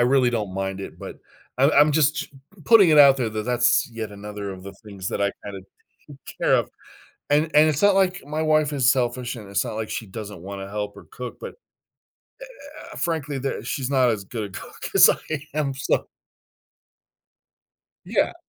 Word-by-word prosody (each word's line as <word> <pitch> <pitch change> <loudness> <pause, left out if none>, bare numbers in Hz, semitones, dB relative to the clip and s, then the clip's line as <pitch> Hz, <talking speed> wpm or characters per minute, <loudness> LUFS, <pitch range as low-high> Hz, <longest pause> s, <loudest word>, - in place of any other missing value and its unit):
really 125 0 +3
don't 105 -5 -3
mind 95 0 -3
it, 95 - -9
but - - -8 0.4
I'm 135 +3 +5
I'm 150 +1 +5
just 155 +1 +1 0.4
putting 205 -7 +6
it 155 - +5
out 140 -2 +8
there 120 -4 -1
that 110 0 -4
that's 120 -1 +2
yet 110 -2 -6
another 105 0 -7
of 95 -1 -11
the 100 +1 -9
things 100 -3 -6
that - - -3
I 100 0 +2
kinda 100 -1 -7 0.5
take 145 -2 -12 0.2
care - - +3
of. - - +1 0.6
And 145 +1 +4
and 150 +1 +6
it's 150 -1 -1
not 205 -1 +5
like 190 -2 +1
my 155 +2 -2
wife 155 -1 +2
is 130 -4 +3
selfish, 125 -1 -1
and 105 -4 -10
it's 100 - 0
not - - -5
like 110 -1 -4
she 110 - -4
doesn't 105 -2 -8
wanna 95 +1 -7
help 105 0 -5
or - - -12
cook, 125 -1 -7
but, - - -6
eh - - -33 1.1
eh - - -12
eh, - - -10
frankly, 150 -4 -2
ther 135 +1 -3
she's 130 -2 -3
not 130 -3 +3
as 105 -4 -2
good 110 +2 -5
a - - -5
cook - - -9
as - - +8
I 155 -2 -5
am, 145 -2 -1
so 135 - -1 2.0
Yeah. - - 0
125 Hz, 200 wpm, -23 LUFS, 105-150 Hz, 2.0 s, out